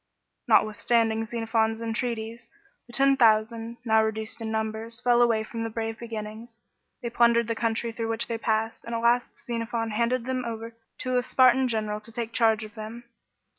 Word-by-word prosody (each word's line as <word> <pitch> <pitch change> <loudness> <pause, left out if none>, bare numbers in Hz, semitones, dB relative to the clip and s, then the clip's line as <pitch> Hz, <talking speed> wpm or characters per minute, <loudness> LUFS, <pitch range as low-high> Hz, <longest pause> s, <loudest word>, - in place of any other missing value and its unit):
Notwithstanding 225 +1 +2
Xenophon's 225 -1 0
entreaties, 230 0 -4 0.4
the 240 - -15
Ten 275 +1 +5
Thousand, 225 0 +2
now 220 -1 +4
reduced 220 +1 -3
in 225 - -3
numbers, 220 +1 -3
fell 245 -1 +3
away 230 -2 +3
from 225 +1 -5
the 225 - -2
brave 225 0 -4
beginnings. 225 0 -7 0.5
They 235 - -3
plundered 235 -1 +4
the 230 - 0
country 230 0 -1
through 225 0 -4
which 225 +1 -1
they 230 -1 -4
passed, 225 0 -1
and 235 - -4
at 230 - -1
last 240 +1 +1
Xenophon 230 -2 -2
handed 235 +2 0
them 255 0 -2
over 230 0 -5 0.3
to 255 -1 +1
a - - 0
Spartan 255 +1 +4
general 215 -3 -2
to 230 - -10
take 230 0 -4
charge 225 -2 +3
of 215 -1 -9
them. 220 +3 -8
230 Hz, 175 wpm, -26 LUFS, 220-235 Hz, 0.5 s, Ten